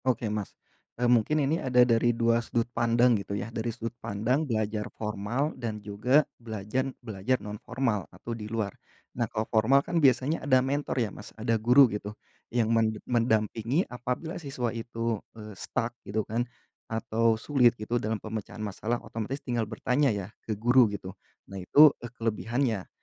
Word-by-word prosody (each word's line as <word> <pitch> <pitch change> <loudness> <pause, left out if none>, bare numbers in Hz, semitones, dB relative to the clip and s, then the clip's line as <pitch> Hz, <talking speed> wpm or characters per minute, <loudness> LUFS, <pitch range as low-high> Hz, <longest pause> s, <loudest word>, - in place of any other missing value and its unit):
Oke 125 -2 +1
Mas, 105 -2 -4 0.4
eee, 125 - 0
mungkin 125 +5 +3
ini 155 +4 0
ada 125 -1 +5
dari 120 0 +3
2 115 0 +2
sudut 115 0 -1
pandang 120 +1 +4
gitu 100 +1 -4
ya 115 +2 -5
dari 115 +1 -2
sudut 115 +1 -5
pandang 125 +9 0
belajar 110 -1 -1
formal 110 +8 -2
dan 115 -4 -4
juga 105 +8 +2 0.2
belajar 110 +4 -2 0.2
belajar 110 +3 0
non 105 -2 -8
formal 115 -6 -1
atau 115 - -7
di 105 -2 -6
luar, 110 -3 -2 0.4
nah 120 -2 -1
kalau 110 -1 -2
formal 120 +7 +3
kan 170 - 0
biasanya 135 +3 +3
ada 130 -3 +4
mentor 140 +1 -1
ya 115 -5 0
Mas 105 - -10
ada 115 +1 0
guru 125 +5 +7
gitu 105 -2 -4 0.3
yang 115 -1 +1
men 110 -1 +2
mendampingi 115 - +1
apabila 125 +8 -4
siswa 130 -6 -3
itu, 115 -1 -3 0.2
eee, 105 -1 -9
stuck 115 +4 -3
gitu 105 +1 -2
kan, 120 +2 -2 0.4
atau 115 0 +1
sulit 120 -1 +3
gitu 115 +3 -2
dalam 110 +1 -1
pemecahan 110 0 -6
masalah 110 +3 -2
otomatis 115 +4 -4
tinggal 120 -4 -1
bertanya 125 +5 +1
ya 100 -4 -2
ke 110 -2 -4
guru 120 +1 +5
gitu 95 -2 -6 0.3
nah 95 -1 -7
itu, 145 +10 +7
eee, 120 - -6
kelebihannya, 115 -1 -1
115 Hz, 170 wpm, -28 LUFS, 110-125 Hz, 0.4 s, guru